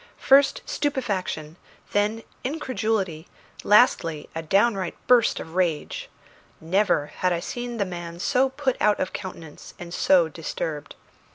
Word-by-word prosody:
First 275 +1 +4
stupefaction, 195 - -2 0.3
then 210 +2 0 0.2
incredulity, 220 - -2 0.4
lastly 180 - +3
a 165 - -3
downright 195 +2 +1
burst 245 -3 +4
of 160 - -8
rage. 175 -4 -1 0.5
Never 165 -3 +1
had 185 - +1
I 170 - 0
seen 240 +5 -5
the 200 - 0
man 175 -2 -7
so 260 +7 +2
put 265 -1 -1
out 210 -1 +3
of 185 - -2
countenance 170 -6 -8
and 175 -1 -9
so 180 -2 +4
disturbed. 155 -1 -5
190 Hz, 125 wpm, -24 LUFS, 165-240 Hz, 0.5 s, First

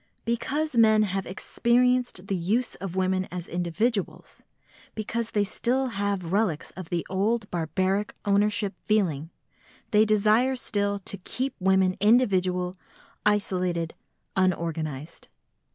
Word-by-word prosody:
Because 265 +6 -1
men 220 -2 +5
have 195 -1 -2
experienced 245 +1 +1
the 195 - -1
use 205 +8 0
of 190 -1 -6
women 185 0 +1
as 180 -1 -5
individuals, 180 +5 -2 0.5
because 225 +1 -2
they 205 - +1
still 250 +6 0
have 200 -5 -2
relics 195 -6 0
of 185 -3 -9
the 170 -1 -1
old 205 +3 0
barbaric 185 +5 -1
ownership 205 0 +2
feeling, 165 -8 0 0.6
they 210 0 +6
desire 215 +4 +3
still 205 -4 -1
to 200 0 -4
keep 260 +8 -3
women 190 -1 +3
individual, 185 -5 +3 0.5
isolated, 180 -5 0 0.4
unorganised. 165 -5 -2
200 Hz, 115 wpm, -26 LUFS, 180-220 Hz, 0.6 s, they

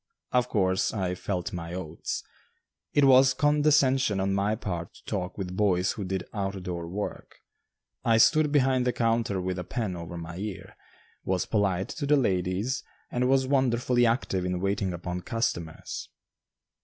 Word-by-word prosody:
Of 125 0 +2
course 95 0 +1
I 95 -3 -1
"felt 90 -1 -3
my 85 0 -5
oats." 85 -3 -4 0.7
It 145 - +4
was 130 0 +6
condescension 140 -6 +3
on 95 0 +1
my 100 +2 +1
part 90 -6 -4
to - - -18
talk 95 -3 -3
with 90 -2 -4
boys 95 -2 +2
who 105 - -5
did 95 -1 -2
out 95 -2 -3
door 85 -2 -4
work. 100 +4 -5 0.7
I 115 -1 +4
stood 155 +5 +5
behind 130 -3 +3
the 125 - +2
counter 115 -4 +1
with 90 0 -2
a - - -3
pen 105 -1 -3
over 85 0 -7
my 85 +1 -7
ear, 100 0 -6 0.5
was 95 -1 0
polite 100 -4 0
to 145 -2 -4
the 150 +1 +5
ladies, 95 +2 0 0.3
and 125 +1 +1
was 135 0 +4
wonderfully 125 -2 +2
active 115 -5 0
in 90 0 -1
waiting 100 0 0
upon 90 +1 -4
customers. 85 -8 -3
100 Hz, 160 wpm, -27 LUFS, 90-125 Hz, 0.7 s, was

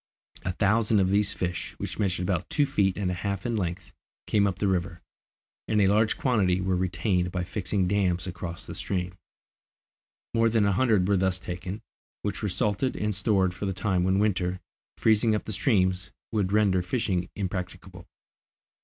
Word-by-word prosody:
A 90 - -2
thousand 105 +2 +2
of 95 -1 +2
these 100 0 +2
fish, 90 -1 -4
which - - -5
measured 95 -3 0
about 90 -2 -1
two 145 - +2
feet 95 -7 +1
and 95 -3 -1
a - - -1
half 100 +1 -3
in 120 -1 0
length, 90 -3 -3 0.3
came 100 -1 +3
up 95 -2 -2
the 100 - 0
river, 85 -2 -1 0.7
and 105 - +2
a 100 - +5
large 105 +2 +3
quantity 100 -8 +2
were 95 0 0
retained 90 0 0
by 90 -1 -2
fixing 95 0 -1
dams 90 -2 +1
across 85 -1 -6
the - - -7
stream. 90 -1 -3 1.2
More 115 0 +3
than 110 -2 +2
a 100 - +3
hundred 105 -3 +3
were 100 -1 +3
thus 95 0 +1
taken, 90 +3 -6 0.4
which 105 -2 -3
were 105 - -1
salted 105 +7 0
and 105 0 -1
stored 95 -2 +2
for 95 +3 -4
the 95 - -1
time 95 -1 0
when 95 +1 +2
winter, 95 -3 +1 0.4
freezing 110 0 +3
up 105 - -3
the 110 - -4
streams, 95 -5 +1 0.2
would 100 -4 0
render 100 -3 +3
fishing 90 -2 -1
impracticable. 90 -1 -5
95 Hz, 180 wpm, -27 LUFS, 90-105 Hz, 1.2 s, a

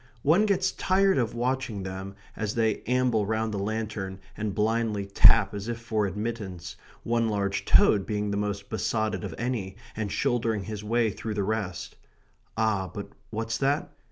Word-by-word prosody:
One 175 +9 +4
gets 190 -2 +2
tired 190 -2 +3
of 120 -2 -1
watching 125 -4 -1
them, 95 +1 -6 0.2
as 105 -1 -2
they 110 -2 +1
amble 125 -3 +2
round 110 0 0
the 100 - -2
lantern 105 -2 -3 0.2
and 105 -2 -3
blindly 110 -1 +1
tap 100 - +6
as 100 +1 -5
if 120 -1 -3
for 110 -3 0
admittance, 95 -4 -5 0.3
one 115 -1 +1
large 100 -2 -1
toad 100 -2 +5
being 105 -1 -1
the - - -1
most 100 -1 -2
besotted 110 -1 -1
of 95 -5 -5
any 115 -6 -2 0.2
and 105 -2 -3
shouldering 115 -5 0
his 105 0 -6
way 115 +1 +2
through 110 +2 -5
the 100 - 0
rest. 100 -4 -3 0.6
Ah, 105 -4 +1
but 100 -2 -6 0.2
what's 115 +1 -2
that? 145 +6 +1
110 Hz, 165 wpm, -27 LUFS, 100-115 Hz, 0.6 s, tap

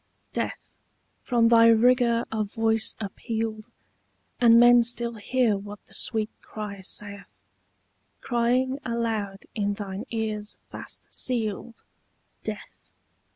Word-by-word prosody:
I. - - -44 0.2
DEATH, - - -4 0.5
from 235 -2 +3
thy 230 -1 +7
rigour 235 +1 +4
a 220 -1 0
voice 225 +1 +1
appealed, 220 +1 -4 0.7
And 235 -1 +7
men 240 0 +8
still 235 0 0
hear 230 +1 +1
what 205 +1 -8
the - - -15
sweet 215 +1 -1
cry 205 -2 -7
saith, 200 - -6 0.7
Crying 250 +3 +1
aloud 225 -5 -2
in 205 -1 0
thine 200 +1 -6
ears 215 -2 -3
fast - - -8
sealed, 230 -2 -3 0.6
Death. - - -8
225 Hz, 110 wpm, -26 LUFS, 210-235 Hz, 0.7 s, men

